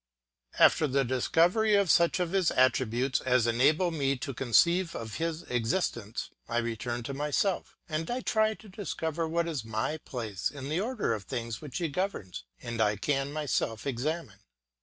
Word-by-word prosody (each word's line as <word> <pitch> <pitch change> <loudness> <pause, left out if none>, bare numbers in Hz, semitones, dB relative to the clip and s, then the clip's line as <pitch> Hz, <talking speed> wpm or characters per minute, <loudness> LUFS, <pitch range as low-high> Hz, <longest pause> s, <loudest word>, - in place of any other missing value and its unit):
After 155 - +5
the 135 0 +1
discovery 175 - +3
of 200 -4 +4
such 170 +2 +4
of 175 -2 -1
his 190 -4 +3
attributes 130 0 +2
as 125 -2 +3
enable 145 +10 +3
me 140 -4 0
to 135 +2 -5
conceive 170 - +3
of 110 -1 -5
his 165 0 -2
existence, 120 - -2 0.2
I 120 - -1
return 120 +1 -2
to 140 - -5
myself, 150 +7 -1
and 160 -1 -3
I 250 +1 -1
try 220 -3 +2
to 220 - -16
discover 165 -5 -3
what 170 +1 0
is 150 -8 -3
my 110 +8 -2
place 110 -9 -3
in 140 -1 -7
the 160 +3 0
order 220 - -1
of 105 -3 -5
things 115 -1 -4
which 145 -4 -6
he 170 - 0
governs, 140 - -3 0.2
and 115 -1 -3
I 105 -1 +3
can 135 +6 -1
myself 145 -7 -1
examine. 140 - -3
140 Hz, 170 wpm, -29 LUFS, 120-170 Hz, 0.2 s, After